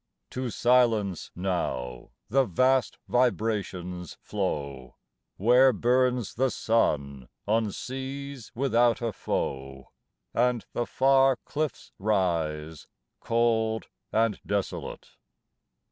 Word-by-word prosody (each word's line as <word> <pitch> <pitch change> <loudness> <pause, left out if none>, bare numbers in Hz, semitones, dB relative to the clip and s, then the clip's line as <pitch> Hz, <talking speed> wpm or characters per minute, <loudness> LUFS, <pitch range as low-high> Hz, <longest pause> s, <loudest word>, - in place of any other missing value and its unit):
To 130 -1 -3
silence 115 -6 +2
now 65 -9 -3 0.2
the 135 +5 +3
vast 130 +6 +2
vibrations 100 - -1
flow, 70 -10 -4 0.4
Where 125 +6 +6
burns 125 +1 +1
the 130 +3 +1
sun 70 - 0 0.2
on 110 0 +1
seas 135 +1 -6
without 120 -2 +2
a 115 -2 -1
foe 65 0 -4 0.4
And 120 -1 +1
the 120 - -1
far 135 0 +4
cliffs 155 0 -3
rise 80 -6 -1 0.3
cold 115 -1 +1 0.2
and 110 -1 +1
desolate. 100 -1 -4
110 Hz, 90 wpm, -27 LUFS, 90-125 Hz, 0.4 s, Where